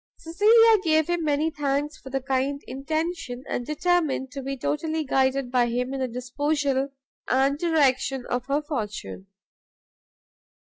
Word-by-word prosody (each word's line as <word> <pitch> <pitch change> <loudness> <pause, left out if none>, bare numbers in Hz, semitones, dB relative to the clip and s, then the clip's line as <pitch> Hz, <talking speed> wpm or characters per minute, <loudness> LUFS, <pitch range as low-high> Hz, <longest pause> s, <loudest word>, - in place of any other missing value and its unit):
Cecilia 435 +6 +5
gave 315 -2 +3
him 345 -1 0
many 305 +1 +1
thanks 290 0 -1
for 265 - -12
the 270 0 -2
kind 270 +2 -1
intention, 310 -1 -3
and 245 - -2
determined 305 -4 0
to 280 -1 -6
be 275 +1 -4
totally 315 +4 -1
guided 265 -2 +1
by 245 -2 +3
him 250 +2 -2
in 270 - -3
the 260 - 0
disposal 275 +3 -1 0.4
and 270 +2 +2
direction 270 -6 +1
of 245 +1 -2
her 285 +2 0
fortune. 215 -8 -5
280 Hz, 140 wpm, -25 LUFS, 260-315 Hz, 0.4 s, Cecilia